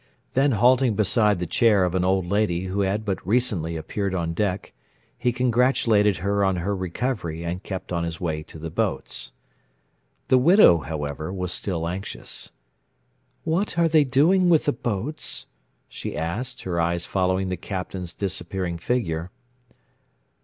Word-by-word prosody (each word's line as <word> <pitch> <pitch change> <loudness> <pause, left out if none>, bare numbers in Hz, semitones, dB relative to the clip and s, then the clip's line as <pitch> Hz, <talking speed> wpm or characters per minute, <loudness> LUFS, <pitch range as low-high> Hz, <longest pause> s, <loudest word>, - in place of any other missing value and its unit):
Then 135 +1 +3
halting 120 +1 +4
beside 105 0 +3
the 90 - -2
chair 100 +3 +3
of 90 -1 0
an 95 -1 +1
old 95 0 +2
lady 95 -2 0
who 95 +2 -3
had 100 +3 0
but 100 -3 -2
recently 95 -7 0
appeared 95 +4 -3
on 85 -2 -1
deck, 95 +1 -2 0.4
he 125 - 0
congratulated 120 -4 +3
her 100 0 +2
on 95 -1 +2
her 95 +4 -1
recovery 95 -3 -3
and 90 +2 -3
kept 95 -2 -6
on 85 -1 0
his 85 -1 -4
way 80 -3 -2
to 75 - -12
the 80 +1 -6
boats. - - -2 1.0
The 130 - +5
widow, 165 - +7
however, 75 0 -4
was 90 -2 -3
still 85 -5 -2
anxious. 95 +3 -6 0.9
"What 170 +3 -1
are 170 -1 +4
they 155 -2 +5
doing 165 +8 +3
with 165 -3 +4
the 145 - +2
boats?" 120 +6 -2 0.4
she - - -6
asked, 125 +11 -3
her 85 -2 -1
eyes 85 +1 0
following 95 0 0
the 90 - -1
Captain's 90 -2 -5
disappearing 90 -2 -3
figure. 85 -6 -1
95 Hz, 155 wpm, -24 LUFS, 85-120 Hz, 1.0 s, widow